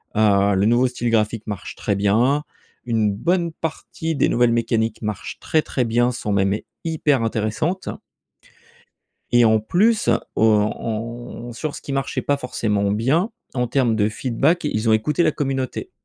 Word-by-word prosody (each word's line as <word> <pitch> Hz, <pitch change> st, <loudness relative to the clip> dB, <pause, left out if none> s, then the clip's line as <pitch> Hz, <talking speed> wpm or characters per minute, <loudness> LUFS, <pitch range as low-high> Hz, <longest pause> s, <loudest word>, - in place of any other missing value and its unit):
Heu, 100 Hz, -2 st, +3 dB
le 95 Hz, +1 st, +2 dB
nouveau 120 Hz, +3 st, +4 dB
style 120 Hz, -1 st, -2 dB
graphique 110 Hz, -1 st, 0 dB
marche 105 Hz, -3 st, -5 dB
très 100 Hz, -, -1 dB
bien. 115 Hz, +9 st, +2 dB, 0.4 s
Une 110 Hz, -3 st, +1 dB
bonne 170 Hz, -, 0 dB
partie 160 Hz, 0 st, -4 dB
des 140 Hz, -, +2 dB
nouvelles 120 Hz, -1 st, +3 dB
mécaniques 115 Hz, -1 st, 0 dB
marchent 105 Hz, -3 st, -5 dB
très, 155 Hz, -1 st, +1 dB
très 125 Hz, -, -1 dB
bien, 120 Hz, +2 st, +2 dB
sont 110 Hz, -3 st, -4 dB
même 100 Hz, 0 st, +2 dB, 0.3 s
hyper 150 Hz, -6 st, +1 dB
intéressantes 115 Hz, -, -1 dB, 1.4 s
et 120 Hz, -1 st, +5 dB
en 110 Hz, -1 st, +4 dB
plus 205 Hz, -, +2 dB, 0.3 s
o -, -, +2 dB
on 115 Hz, +2 st, -1 dB
sur 145 Hz, +6 st, -4 dB
ce -, -, -8 dB
qui 140 Hz, -, -5 dB
marchait 135 Hz, 0 st, -1 dB
pas 145 Hz, -, +1 dB
forcément 105 Hz, -6 st, -1 dB
bien, 135 Hz, -, +1 dB, 0.2 s
en 125 Hz, -1 st, 0 dB
termes 120 Hz, -2 st, +1 dB
de 105 Hz, -1 st, +2 dB
feedback, 135 Hz, +9 st, 0 dB
ils 115 Hz, -6 st, 0 dB
ont -, -, +5 dB
écouté 140 Hz, +10 st, +1 dB
la 155 Hz, -, +3 dB
communauté. 135 Hz, -3 st, -3 dB
120 Hz, 160 wpm, -21 LUFS, 110-140 Hz, 1.4 s, et